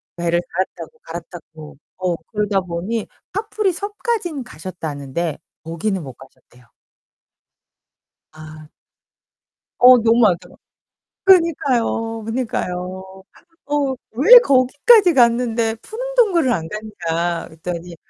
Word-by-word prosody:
배를 170 Hz, 0 st, 0 dB
갈아타고, 175 Hz, -3 st, -5 dB
갈아타고 160 Hz, -3 st, -10 dB, 0.2 s
어 185 Hz, -2 st, -1 dB, 0.2 s
그러다 210 Hz, -2 st, 0 dB
보니 185 Hz, +6 st, -4 dB, 0.3 s
카프리 420 Hz, -2 st, -1 dB
섬까지는 400 Hz, -, -4 dB
가셨다는데 155 Hz, -, -5 dB, 0.3 s
거기는 175 Hz, +4 st, -3 dB
못 135 Hz, -4 st, -9 dB
가셨대요. 125 Hz, -2 st, -20 dB, 1.6 s
아. 155 Hz, -1 st, -12 dB, 1.1 s
어 250 Hz, 0 st, +8 dB
너무 230 Hz, 0 st, +3 dB
많더라 180 Hz, -4 st, +1 dB, 0.7 s
그러니까요. 265 Hz, -, +2 dB
그러니까요. 190 Hz, -5 st, -5 dB, 0.4 s
어 285 Hz, -2 st, 0 dB, 0.2 s
"왜 360 Hz, -, +8 dB
거기까지 295 Hz, -, +4 dB
갔는데 235 Hz, -2 st, +2 dB
푸른 450 Hz, +3 st, -7 dB
동굴을 360 Hz, -, +3 dB
안 165 Hz, -6 st, -3 dB
갔냐?" 175 Hz, -6 st, -3 dB
그랬더니 170 Hz, +1 st, -7 dB
210 Hz, 245 characters per minute, -19 LUFS, 170-265 Hz, 1.6 s, 어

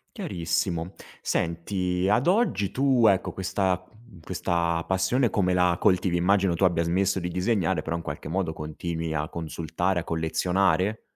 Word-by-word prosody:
Chiarissimo. 85 Hz, +1 st, -2 dB, 0.3 s
Senti, 90 Hz, +2 st, -1 dB
ad 125 Hz, +8 st, +2 dB
oggi 150 Hz, -, +2 dB
tu, 130 Hz, -4 st, +3 dB
ecco, 95 Hz, -3 st, +2 dB
questa, 95 Hz, -1 st, -1 dB
uhm, 110 Hz, -4 st, -18 dB
questa 85 Hz, 0 st, -1 dB
passione 95 Hz, +7 st, +1 dB
come 90 Hz, -4 st, +1 dB
la 90 Hz, -1 st, +3 dB
coltivi? 90 Hz, -1 st, +2 dB
Immagino 95 Hz, +1 st, +2 dB
tu 85 Hz, +3 st, +2 dB
abbia 85 Hz, -2 st, +2 dB
smesso 95 Hz, +3 st, +1 dB
di 90 Hz, -, -3 dB
disegnare, 95 Hz, -2 st, 0 dB
però 80 Hz, +2 st, -3 dB
in 85 Hz, -, -3 dB
qualche 75 Hz, -2 st, -6 dB
modo 90 Hz, +1 st, -1 dB
continui 80 Hz, +1 st, -4 dB
a 75 Hz, 0 st, -2 dB
consultare, 85 Hz, +2 st, -2 dB
a -, -, -8 dB
collezionare? 90 Hz, +5 st, 0 dB
90 Hz, 150 wpm, -26 LUFS, 85-95 Hz, 0.3 s, tu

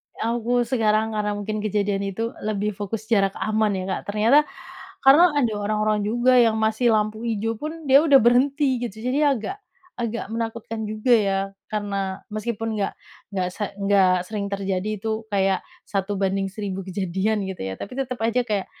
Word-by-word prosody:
Aku 240 Hz, +1 st, 0 dB
sekarang 220 Hz, -2 st, +2 dB
karena 210 Hz, -1 st, -1 dB
mungkin 215 Hz, +1 st, -3 dB
kejadian 205 Hz, -1 st, 0 dB
itu 225 Hz, +4 st, -3 dB
lebih 210 Hz, 0 st, -1 dB
fokus 205 Hz, +2 st, -5 dB
jarak 195 Hz, -3 st, +3 dB
aman 215 Hz, 0 st, +1 dB
ya 185 Hz, -, -3 dB
Kak, 190 Hz, -, -2 dB
ternyata 220 Hz, +7 st, +5 dB, 0.7 s
karena 305 Hz, +7 st, +8 dB
ada 240 Hz, -6 st, +2 dB
orang-orang 210 Hz, +1 st, 0 dB
juga 240 Hz, +4 st, +2 dB
yang 225 Hz, -2 st, +3 dB
masih 220 Hz, +2 st, +2 dB
lampu 215 Hz, +1 st, -1 dB
ijo 225 Hz, 0 st, -1 dB
pun 310 Hz, +2 st, -6 dB
dia 275 Hz, +1 st, +7 dB
udah 295 Hz, -4 st, +6 dB
berhenti 260 Hz, +2 st, +3 dB
gitu 235 Hz, -4 st, -5 dB
jadi 265 Hz, +6 st, +1 dB
agak, 385 Hz, -, -5 dB, 0.4 s
agak 235 Hz, -1 st, -2 dB
menakutkan 225 Hz, -1 st, -4 dB
juga 215 Hz, +3 st, -1 dB
ya 200 Hz, -4 st, +3 dB, 0.3 s
karena 200 Hz, -2 st, -3 dB
meskipun 225 Hz, +1 st, -3 dB
nggak 195 Hz, -, 0 dB, 0.4 s
nggak 185 Hz, -2 st, -1 dB
se 210 Hz, -, -4 dB, 0.2 s
nggak 195 Hz, -2 st, +4 dB, 0.2 s
sering 205 Hz, +1 st, -4 dB
terjadi 195 Hz, 0 st, -2 dB
itu 220 Hz, +1 st, -2 dB
kayak 195 Hz, -1 st, +2 dB, 0.3 s
1 200 Hz, 0 st, -2 dB
banding 195 Hz, 0 st, 0 dB
1.000 195 Hz, -1 st, -5 dB
kejadian 195 Hz, +3 st, -1 dB
gitu 190 Hz, -1 st, -6 dB
ya, 95 Hz, -, -4 dB
tapi 200 Hz, -, -7 dB
tetep 255 Hz, -2 st, -3 dB
aja 230 Hz, +2 st, +2 dB
kayak 200 Hz, -2 st, 0 dB
215 Hz, 165 wpm, -23 LUFS, 200-235 Hz, 0.7 s, karena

